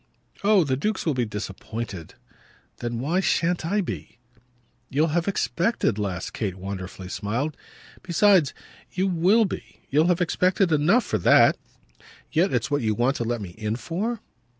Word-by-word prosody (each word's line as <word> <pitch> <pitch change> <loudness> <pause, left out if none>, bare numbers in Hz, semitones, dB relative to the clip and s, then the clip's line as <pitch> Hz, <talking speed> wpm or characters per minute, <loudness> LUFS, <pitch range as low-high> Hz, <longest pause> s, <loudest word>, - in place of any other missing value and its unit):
"Oh 200 -3 +5
the 135 -3 0
dukes 215 +11 -2
will 160 - +2
be 125 -2 0
disappointed!" 100 -2 -6 0.6
"Then 120 0 -3
why 160 +9 0
shan't 175 -2 +1
I 205 +4 +1
be?" 170 - -6 0.7
"You'll 150 +4 +2
have 175 +1 0
expected 190 - 0
less," 95 -4 -3
Kate 100 -5 -3
wonderfully 95 0 -7
smiled. 115 +10 -2 0.5
"Besides, 185 -3 +4 0.4
you 185 +1 0
WILL 190 +5 +3
be. 190 - -7
You'll 155 +4 +4
have 180 -1 +2
expected 180 +1 +2
enough 165 +11 +4
for - - -1
that." - - +6 0.8
"Yet 170 +5 +2
it's 125 +2 -1
what 145 0 +1
you 110 -2 0
want 125 +5 +1
to - - -1
let 120 -1 -2
me 95 - -6
in 110 +3 -3
for?" 200 - -3
150 Hz, 155 wpm, -25 LUFS, 110-180 Hz, 0.8 s, that